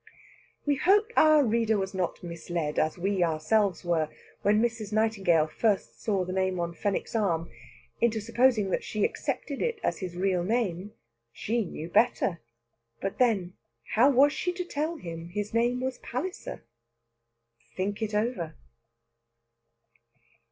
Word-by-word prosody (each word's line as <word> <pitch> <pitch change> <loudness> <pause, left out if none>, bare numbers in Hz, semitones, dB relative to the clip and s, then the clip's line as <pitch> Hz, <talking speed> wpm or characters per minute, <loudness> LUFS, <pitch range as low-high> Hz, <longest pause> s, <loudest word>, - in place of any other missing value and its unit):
We 290 -1 +2
hope 415 - +3
our 310 -1 +6
reader 225 -1 +2
was 190 0 -2
not 185 -2 -2
misled, 170 -2 -3
as 155 +2 0
we 190 +1 +1
ourselves 175 +4 +1
were, 160 -3 +1 0.3
when 210 +1 +3
Mrs. 225 -2 -1
Nightingale 200 -7 +3
first 200 +6 -1
saw 195 -4 0
the 185 - -4
name 185 -1 0
on 170 0 -2
Fenwick's 200 +4 -2
arm, 170 - 0 0.5
into 230 -1 +2
supposing 230 -2 +2
that - - 0
she 210 -1 0
accepted 280 -3 -3
it 470 -2 -1
as - - 0
his 180 -3 -5
real 185 -1 +1
name. 205 -2 -1 0.4
She 230 - -1
knew 165 -3 -6
better. 190 -2 +2 0.6
But 195 - -4
then, 205 -8 +2 0.4
how 245 +5 +6
was 285 +2 +5
she 360 - -1
to 360 0 -4
tell 315 +1 -2
him 170 - -7
his 205 +3 -4
name 240 +2 +2
was 260 0 -3
Palliser? 320 +10 -5 1.1
Think 200 +3 -2
it 215 -1 -2
over. 210 -8 -1
205 Hz, 145 wpm, -28 LUFS, 175-240 Hz, 1.1 s, our